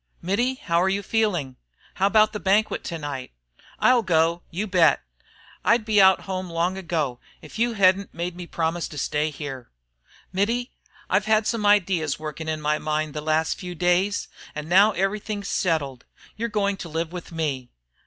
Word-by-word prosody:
"Mittie, 235 +9 0
how're 180 -7 +1
you 200 +1 -1
feeling? 180 - 0 0.4
How 195 - +2
about 215 +1 +4
the 210 - -3
banquet 205 +3 +1
to 170 - -4
night?" 145 -4 -6 0.4
"I'll 250 -1 +4
go, 170 -2 +2
you 190 +6 -3
bet. 175 -7 +3 0.6
I'd 230 -1 +3
be 215 -2 +4
out 190 0 +6
home 185 -1 -4
long 170 +2 0
ago, 160 -9 -2 0.2
if 155 +8 -10
you 235 0 +2
hedn't 195 -1 +3
made 175 +1 -4
me 175 -1 -8
promise 165 +1 -1
to 150 - -10
stay 150 +2 0
here." 135 -4 -7 0.6
"Mittie, 230 +6 0 0.4
I've 205 - +1
had 215 0 +3
some 215 -3 0
ideas 180 -7 +2
working 155 +1 -6
in 155 -1 -2
my 150 0 +1
mind 155 -1 -2
the 150 - -4
last 155 +1 0
few 180 -2 -6
days, 180 +4 +1 0.3
and 150 0 -5
now 195 +5 +6
everything's 205 +1 -2
settled. 145 -8 -1 0.3
You're 235 +2 -3
going 200 -2 0
to 170 - -7
live 160 +1 -3
with 180 -1 -7
me." 145 -6 -3
180 Hz, 175 wpm, -24 LUFS, 155-205 Hz, 0.6 s, out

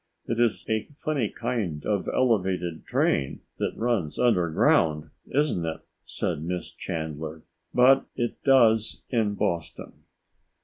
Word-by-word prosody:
"It 115 0 -2
is 120 -3 +1
a 110 -1 -1
funny 140 -10 -1
kind 110 -11 -3
of 100 -3 0
elevated 95 -9 0
train 70 -1 0 0.2
which - - -2
runs 110 -11 -1
underground, 80 -7 +2 0.2
isn't 140 - +1
it?" 80 -1 -4 0.2
said - - -3
Miss 90 +2 -4
Chandler. 80 0 -5 0.3
"But 135 +2 +5
it 120 -2 -3
does 115 -5 +4
in 110 -5 +1
Boston." 85 -4 -3
100 Hz, 120 wpm, -26 LUFS, 80-120 Hz, 0.3 s, But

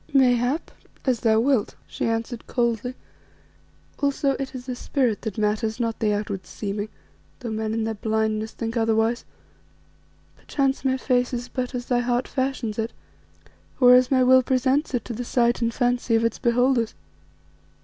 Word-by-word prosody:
"Mayhap 255 +2 +3 0.3
as 255 -4 +2
thou 220 -1 +3
wilt," 250 -2 +1
she - - -3
answered 230 +1 -3
coldly; 240 0 -1 1.0
"also 280 0 +1
it 270 0 -4
is 250 -1 -7
the 255 -1 -4
spirit 245 -4 0
that 220 -4 -5
matters, 220 +2 0
not 230 -2 -1
the 215 -1 +2
outward 205 -2 -3
seeming, 205 0 -4 0.5
though 235 -3 -4
men 220 0 -2
in 225 0 -1
their 225 0 -1
blindness 220 0 -1
think 230 0 -4
otherwise. 225 +1 +1 1.1
Perchance 275 -1 -1
my 265 -1 +1
face 250 -1 +1
is 245 +1 -5
but 255 0 -3
as 245 -1 -3
thy 245 -1 +1
heart 245 +1 0
fashions 260 -5 -2
it, 225 +1 -2 0.9
or 250 -1 +8
as 250 0 +5
my 260 -2 +4
will 260 +1 +6
presents 260 +3 +1
it 235 - -2
to 240 - -5
the 240 +2 -4
sight 240 0 +1
and 230 0 +1
fancy 245 -1 +1
of 225 0 +2
its 230 - -1
beholders. 240 -1 +2
240 Hz, 165 wpm, -24 LUFS, 225-255 Hz, 1.1 s, or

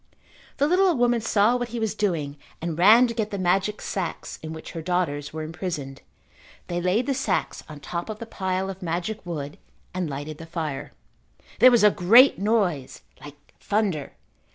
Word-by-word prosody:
The 285 - +3
little 370 +4 +4
old 345 -6 +2
woman 240 -1 +2
saw 220 +1 +3
what 245 -1 -2
he 235 0 -5
was 220 -2 -1
doing 165 -9 -2 0.2
and 165 -1 -3
ran 220 +7 +7
to 235 - -3
get 220 -2 -2
the 200 - -4
magic 190 +3 0
sacks 185 -4 -4
in 155 - -7
which 160 0 -8
her 165 - -6
daughters 160 -4 -1
were 155 0 -5
imprisoned. 155 -4 -5 0.6
They 175 0 -3
laid 185 +7 +1
the 280 - 0
sacks 265 - -2
on 150 -2 -10
top 170 +6 -5
of 215 - -5
the 230 - -7
pile 190 -3 -2
of 190 +1 -11
magic 180 +5 -3
wood 145 -4 -5 0.3
and 180 -3 -2
lighted 145 +2 -6
the 165 - -9
fire. 160 -5 -5 0.7
There 250 +4 +9
was 240 -3 +4
a 210 - +7
great 230 +11 +6
noise 195 - 0 0.2
like 145 -1 -10 0.2
thunder. 200 -9 -1
185 Hz, 185 wpm, -25 LUFS, 160-220 Hz, 0.7 s, There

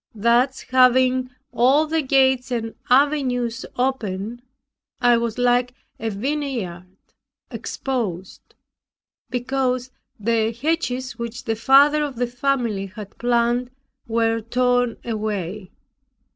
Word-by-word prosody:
Thus 235 +5 +2
having 255 0 +3 0.2
all 270 +6 +4
the 320 +1 0
gates 265 -2 +2
and 225 -2 -3 0.2
avenues 255 -3 +2
open, 240 -3 -2 0.6
I 245 -1 +5
was 230 -1 -2
like 245 0 +2 0.2
a 225 - -2
vineyard 220 -6 -3 0.6
exposed, 205 -9 -5 0.7
because 255 0 -1 0.3
the 225 +1 +1
hedges 255 -5 -2
which 235 +1 -5
the 225 -3 -1
father 280 +6 +5
of 285 -3 -4
the 245 +1 0
family 240 -5 -1
had 200 +1 -10
planted 240 +1 +1 0.4
were 225 0 +1
torn 245 +1 +1
away. 210 -4 -3
245 Hz, 105 wpm, -22 LUFS, 225-260 Hz, 0.7 s, I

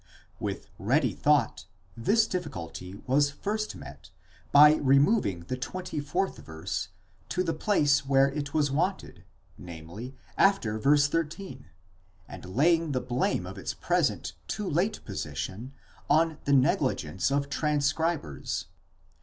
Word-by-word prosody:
With - - -4
ready 125 - +2
thought 140 - +1 0.3
this 215 - +3
difficulty 95 - -5
was 140 +2 +3
first 215 +8 -3
met - - -11 0.4
by 150 +2 +8
removing 140 - +3
the 90 +9 -4
24th 175 +4 -3
verse 80 0 -5 0.4
to 185 - 0
the 165 -2 -1
place 150 -5 +2
where 135 0 +4
it 145 0 -4
was 145 -2 +1
wanted, 180 +7 -2 0.3
namely, 90 +9 -9 0.2
after 120 - +3
v. 145 +6 +4
13, 150 0 -2 0.6
and - - -10
laying 165 +1 +3
the 130 - +1
blame 130 +12 -1
of - - -8
its - - -4
present - - 0
too 210 -2 -3
late 180 +6 -1
position 95 - -5 0.4
on 160 +1 +3
the 140 - +2
negligence 95 - +2
of 140 0 0
tran 150 0 0
scribers. 145 - -1
145 Hz, 125 wpm, -28 LUFS, 120-165 Hz, 0.6 s, by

